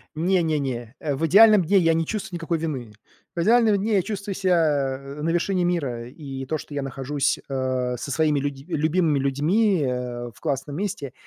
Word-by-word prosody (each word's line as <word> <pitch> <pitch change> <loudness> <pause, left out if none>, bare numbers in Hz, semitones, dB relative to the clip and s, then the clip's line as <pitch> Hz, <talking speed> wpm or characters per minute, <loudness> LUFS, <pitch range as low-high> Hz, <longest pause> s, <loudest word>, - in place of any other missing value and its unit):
Не 175 +3 +2
не 155 -2 0
не, 120 -2 -4
э, 145 -3 -2
в 160 - -1
идеальном 210 +3 +7
дне 195 +4 +3
я 165 -2 +3
не 165 - 0
чувствую 210 -1 -4
никакой 165 -1 -2
вины. 130 -9 -4 0.4
В 170 - -1
идеальном 225 0 +4
дне 210 +2 0
я 190 - +4
чувствую 200 -2 -4
ся 150 -8 +1 0.2
на 165 - -1
вершине 180 +2 +1
мира, 140 -10 -1
и 135 0 -7
то, 155 +2 -2
что 145 - -9
я 140 - -2
нахожусь, 135 +1 -1
э, 130 -2 -1
со 140 - -6
своими 150 -1 +2
люди 140 -1 -4
любимыми 160 -1 +1
людьми, 160 +8 +2
э, 125 -2 -3
в - - -18
классном 145 -2 -3
месте. 180 - -4
155 Hz, 190 wpm, -24 LUFS, 135-180 Hz, 0.4 s, идеальном